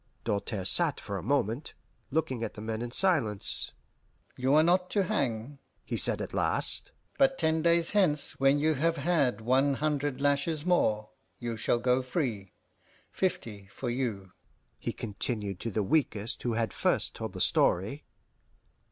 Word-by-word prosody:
Doltaire 100 -2 -2
sat 160 - +3
for 100 -2 -5
a - - -7
moment, 125 - -1 0.3
looking 130 -6 -1
at 110 - -5
the - - -9
men 110 +1 -4
in 120 - -4
silence. 125 - +2 0.6
"You 130 +3 +1
are 155 - +6
not 180 +2 +2
to 200 - +1
hang," 135 - -2 0.3
he - - -3
said - - +2
at - - -8
last; - - +2 0.3
"but 270 -1 +4
ten 160 -1 +1
days 170 0 +2
hence, 180 -8 +1
when 135 +1 +4
you 155 +2 +2
have 165 +4 0
had 140 -6 +1
one 135 +4 +2
hundred 145 -2 -1
lashes 145 +2 0
more, 110 -12 +1 0.3
you 120 -2 -4
shall 110 +2 0
go 125 +2 +2
free. 125 - -3 0.6
Fifty 110 - -3
for 120 +5 -5
you," 110 -7 -3 0.5
he - - -3
continued 105 -3 -3
to 115 - -4
the 105 -1 -1
weakest 115 -4 0
who 120 - -1
had 110 -2 -1
first - - 0
told - - -6
the - - -7
story. 105 +12 +2
130 Hz, 160 wpm, -29 LUFS, 110-155 Hz, 0.6 s, are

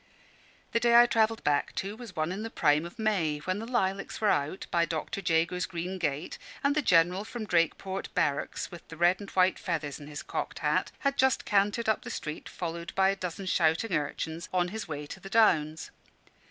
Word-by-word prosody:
The 230 - +2
day 235 0 +4
I 240 0 +9
travelled 225 -1 +1
back 145 -1 +1
to 195 +2 -3
was 230 -5 -10
one 155 +2 -1
in 195 +3 -4
the 225 - -4
prime 150 -5 +2
of 175 - -15
May, 195 -9 +1
when 185 +6 -3
the 225 - -6
lilacs 200 -5 -1
were 215 -2 +3
out 145 +6 -1
by 170 -1 +3
Dr. 165 +4 -3
Jago's 170 +1 +1
green 180 +1 -4
gate, 145 -3 -2 0.2
and 280 0 +3
the 300 - +2
General 180 - +3
from 225 0 -6
Drakeport 190 +2 0
Barracks, 145 -2 -1
with 175 -2 -11
the 165 - -10
red 175 +2 +4
and 200 - -8
white 185 0 +3
feathers 160 -5 -3
in 145 - -10
his 150 -1 -7
cocked - - -4
hat, - - +1
had 275 -1 0
just 265 -1 +3
cantered 205 +3 +2
up 220 - +2
the - - -8
street, 150 0 -5
followed 170 -1 -5
by 190 0 +4
a 195 - +1
dozen 185 0 -5
shouting 175 +3 +2
urchins, 160 +2 -2
on 180 -1 +1
his 220 +1 -5
way 150 -2 -5
to 170 - -9
the 195 - -10
Downs. 160 -8 +2
180 Hz, 205 wpm, -29 LUFS, 160-210 Hz, 0.2 s, I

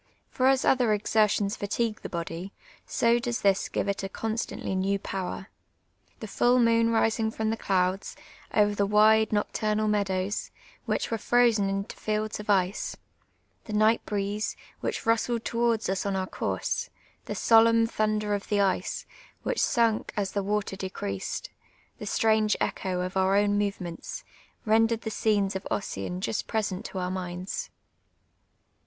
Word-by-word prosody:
For 260 -1 +2
as 270 0 +3
other 245 -5 +4
exertions 210 -1 +2
fatigue 215 +2 -2
the - - -6
body, 170 +2 -5 0.4
so 235 +1 +3
does 240 0 -2
this 195 -1 +2
give - - -1
it 200 0 -1
a 195 - -4
constantly 220 -1 -3
new 190 +1 +1
power. 190 0 -5 0.7
The 220 - -5
full 245 +4 +3
moon 230 -1 +4
rising 225 -1 +2
from 220 0 -1
the - - 0
clouds, 185 -2 0 0.4
over 210 -1 +3
the 200 -1 +1
wide 215 +1 +5
nocturnal 215 0 0
meadows, 200 -1 -1 0.4
Avhich - - -1
were 225 - -1
frozen 230 -4 +3
into 195 +2 -3
fields 215 0 -2
of 210 - -8
ice; 190 -1 +1 0.7
the 215 - -6
night 215 +2 +3
breeze, 205 +1 -2 0.2
which - - -3
rustled 230 +1 +1
towards 230 -1 +1
us 190 0 -1
on 200 -1 -1
our 190 -1 -1
couixe: - - -2 0.4
the - - -4
solemn 230 0 +5
tlnuuler 215 -1 0
of 200 - -6
the 205 - +2
ice, 195 -1 0 0.4
which - - -1
sunk 230 -3 +1
as 200 -2 0
the 200 - -1
water 205 0 -1
decreased; 185 - -4 0.5
the 210 - -6
strange 220 0 +2
echo 185 -1 -1
of 185 +1 -4
our 190 +1 +3
own 205 0 +3
movements, 200 - -3 0.4
rendered 225 +1 +3
the 220 - -4
scenes 205 -3 +1
of 190 - -4
Ossian 180 -2 -3
ju'^t 205 - -2
present 205 -4 -2
to - - -6
our 180 0 -2
minds. 185 - -4
210 Hz, 155 wpm, -27 LUFS, 195-225 Hz, 0.7 s, wide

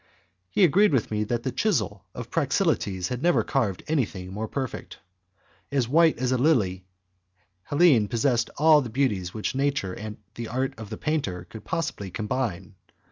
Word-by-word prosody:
He 200 - +2
agreed 185 +2 +5
with 120 -5 +1
me 105 0 0
that 120 +2 -2
the 130 - -1
chisel 110 - 0
of 120 -1 -7
Praxiteles 140 - 0
had 125 0 -3
never 175 +2 +3
carved 110 -10 -1
anything 100 -12 -2
more 110 +2 -3
perfect. 130 +1 -5 0.7
As 135 -4 +1
white 160 +4 +4
as 125 +1 -1
a 130 - +1
lily, 105 - +2 0.8
Helene 145 -9 +4
possessed 120 +2 +1
all 155 0 +6
the 125 - -5
beauties 110 -8 -1
which 110 - -2
nature 135 -8 0
and 105 +1 -7 0.2
the 115 -1 -6
art 130 +3 -1
of 110 -2 -8
the 110 - -6
painter 135 - -2
can 110 - -8
possibly 145 - -3
combine. 105 -2 -3
120 Hz, 165 wpm, -26 LUFS, 105-145 Hz, 0.8 s, all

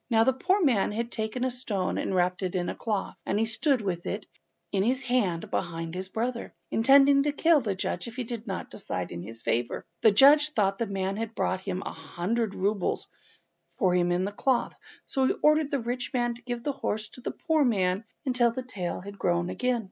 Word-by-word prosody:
Now 225 -2 +5
the 265 +3 +3
poor 370 +9 +1
man 235 -11 +3
had 230 +3 -3
taken 220 +3 -2
a 260 - +1
stone 210 -7 -2
and 190 - -1
wrapped 180 +1 +1
it 185 -1 -2
in 175 -1 0
a - - -4
cloth, 215 -4 -2
and 200 - -1
he 225 - +2
stood 230 +4 +1
with 180 -4 -3
it - - -3 0.5
in 195 - +1
his 255 +6 +1
hand, 240 -10 0
behind 165 -2 -3
his 185 +1 -4
brother, 235 +4 -3 0.2
intending 275 +4 +6
to 295 +1 +1
kill 315 +1 +4
the 205 -5 -2
judge 185 - -3
if 230 - -8
he 255 - -2
did 235 -1 -6
not 190 - -4
decide - - -4
in 85 - -5
his 115 +4 -9
favour. 120 +1 -1 0.2
The 220 - +7
judge 285 +8 +7
thought 195 -4 +1
the 230 - 0
man 195 0 -2
had 225 0 -4
brought 185 +1 -1
a 185 -1 -1
hundred 205 +4 -2
roubles 200 0 -1 0.7
for 185 -3 +3
him 175 -1 +2
in 180 +1 +1
the 200 - -3
cloth, 250 +4 0 0.3
so 265 -2 +1
he - - +2
ordered 305 -1 +4
the 280 - 0
rich 245 +2 -3
man 240 -1 +1
to 235 - -13
give 240 -1 -5
his 290 - 0
horse 215 0 -2
to 250 - -13
the - - -3
poor 320 -2 +1
man 195 -5 +1 0.2
until 250 -2 +3
the 255 +2 -5
tail 185 -7 -4
was 200 0 -8
grown 175 -1 0
again. 250 -1 0
225 Hz, 220 wpm, -28 LUFS, 190-255 Hz, 0.7 s, The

